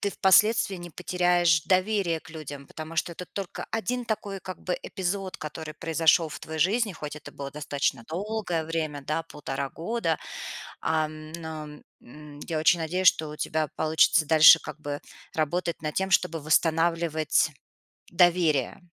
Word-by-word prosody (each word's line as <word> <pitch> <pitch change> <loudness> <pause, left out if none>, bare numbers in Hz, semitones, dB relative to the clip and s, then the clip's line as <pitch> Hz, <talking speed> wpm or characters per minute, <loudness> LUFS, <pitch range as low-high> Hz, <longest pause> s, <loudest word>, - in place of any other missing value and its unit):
ты 200 - 0
впоследствии 200 +1 +4
не 175 -1 -9
потеряешь 175 -2 +2
доверие 185 -3 +1
к - - -15
людям. 145 -3 -8
Потому 155 +1 -8
что 170 - 0
это 180 +2 -8
только 200 -1 -5
один 245 +2 -1
такой, 205 -3 -3
как 185 0 -8
бы, 180 - -1
эпизод, 190 0 -3
который 155 0 -7
произошёл 165 +1 +2
в - - -7
твоей 160 0 -5
жизни, 210 +4 +2
хоть 150 -3 -7
это 150 - -11
было 140 -1 -6
достаточно 140 -4 -2
долгое 185 -1 -2
время, 155 -3 -3
да, 160 +3 -2
1,5 140 -3 -5
года, 170 -1 -1 0.7
ам, 155 -1 -2
но, 160 -2 -6 0.4
м, 145 +3 -13
я 160 -2 -1
очень 170 +2 +4
надеюсь, 180 +4 +1
что 155 -2 +4
у 150 - -8
тебя 155 -1 -1
получится 155 0 +4
дальше, 160 +1 +9
как 150 - -8
бы, 145 -1 -4 0.3
работать 170 +2 -1
над 155 -1 -3
тем, 190 0 0
чтобы 170 -4 +2
восстанавливать 160 0 +2 0.6
доверие. 170 -6 +3
165 Hz, 155 wpm, -27 LUFS, 155-180 Hz, 0.7 s, дальше